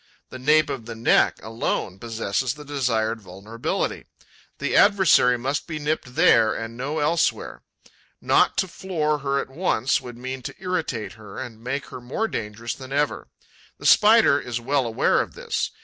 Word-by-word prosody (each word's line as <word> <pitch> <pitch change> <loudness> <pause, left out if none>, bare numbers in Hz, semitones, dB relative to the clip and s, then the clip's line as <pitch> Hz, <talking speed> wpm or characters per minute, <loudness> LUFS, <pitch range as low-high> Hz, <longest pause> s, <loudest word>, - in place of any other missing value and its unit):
The 130 - -9
nape 150 +4 +3
of 115 -4 -6
the 115 - -6
neck 115 +1 +3
alone 110 -3 -3
possesses 115 +3 -2
the 150 0 -11
desired 115 -6 -1
vulnerability. 100 +5 -4 0.5
The - - -2
adversary 185 - +5
must 135 +4 -2
be 160 -2 -4
nipped 150 -4 -3
there 110 -1 +5
and 115 0 -6
no 140 +5 -3
elsewhere. 155 +3 0 0.6
Not - - +3
to 190 - +1
floor 160 -5 -2
her 140 0 -1
at 135 - -5
once 135 -5 0
would 120 -1 -9
mean 130 +1 -6
to - - -7
irritate 170 - -3
her 100 -2 -11
and 115 -3 -8
make 135 +3 -3
her 125 - -8
more 135 - -2
dangerous 115 - -4
than 130 -1 -11
ever. 145 +1 -1 0.5
The - - -11
Spider 215 -8 +6
is 120 -3 -4
well 135 +1 0
aware 115 - +2
of - - -7
this. - - -2
130 Hz, 165 wpm, -24 LUFS, 115-150 Hz, 0.6 s, Spider